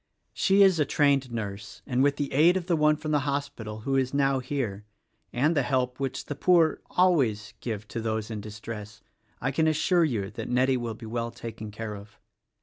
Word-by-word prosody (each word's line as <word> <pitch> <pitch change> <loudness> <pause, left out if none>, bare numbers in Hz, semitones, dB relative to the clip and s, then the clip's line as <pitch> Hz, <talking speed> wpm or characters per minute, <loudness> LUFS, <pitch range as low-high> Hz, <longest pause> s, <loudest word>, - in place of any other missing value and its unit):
She 200 +1 +4
is 190 -4 +4
a - - +5
trained 140 -3 +2
nurse, 105 -2 -6
and 130 -2 0
with 140 +1 +3
the 145 -1 -3
aid 165 +6 +5
of 180 - -4
the 175 -2 +1
one 150 -1 +4
from 155 0 -5
the 150 - +3
hospital, 140 -6 -4
who 135 +4 -1
is 130 +1 0
now 135 -1 +2
here, 120 -7 -3 0.5
and 150 +7 +1
the 145 - +3
help 125 -1 -1
which 135 -1 -3
the - - -4
poor 165 +1 +3
always 135 - +2
give 110 -3 -5
to 115 - -4
those 110 0 -2
in 105 -2 -4
distress, 105 0 -8 0.4
I 135 - 0
can 160 +3 +2
assure 165 +3 +3
you 110 -11 -1
that 110 - -6
Nettie 130 +2 +3
will 120 -2 -4
be 115 - -10
well 115 +1 -3
taken 115 -2 -8
care 110 0 -6
of." 100 +1 -13
130 Hz, 205 wpm, -27 LUFS, 110-145 Hz, 0.5 s, a